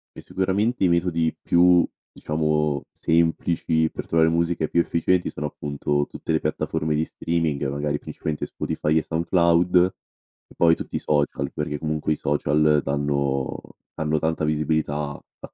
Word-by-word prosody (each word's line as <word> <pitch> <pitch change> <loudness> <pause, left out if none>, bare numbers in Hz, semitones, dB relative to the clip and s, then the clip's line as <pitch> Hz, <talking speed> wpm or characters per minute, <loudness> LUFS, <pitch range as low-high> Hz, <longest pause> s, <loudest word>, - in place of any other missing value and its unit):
E - - -9
sicuramente 100 +5 -1
i 90 - +4
metodi 85 -2 +1
più 90 0 +4 0.2
diciamo, 75 -2 0
semplici 80 -1 +1
per - - -7
trovare 80 -1 +3
musiche 85 -1 0
più 85 - +2
efficienti, 85 +2 +1
sono 75 - -5
appunto 75 0 -2
tutte - - -4
le 80 - +1
piattaforme 75 0 -1
di 75 +1 +1
streaming, 80 -5 -2
magari, 75 +1 -2
principalmente 75 +1 -5
Spotify 80 +1 -1
e - - +3
SoundCloud, 85 +1 +2 0.7
e - - -18
poi, 85 -1 +5
tutti - - -7
i - - -3
social, 70 -2 -1
perché 75 -1 -3
comunque 75 0 -2
i - - -5
social 75 +1 +2
danno 70 -1 -1 0.4
danno 80 0 0
tanta 80 +1 -1
visibilità, 75 0 0 0.2
a - - -13
80 Hz, 145 wpm, -23 LUFS, 75-85 Hz, 0.7 s, poi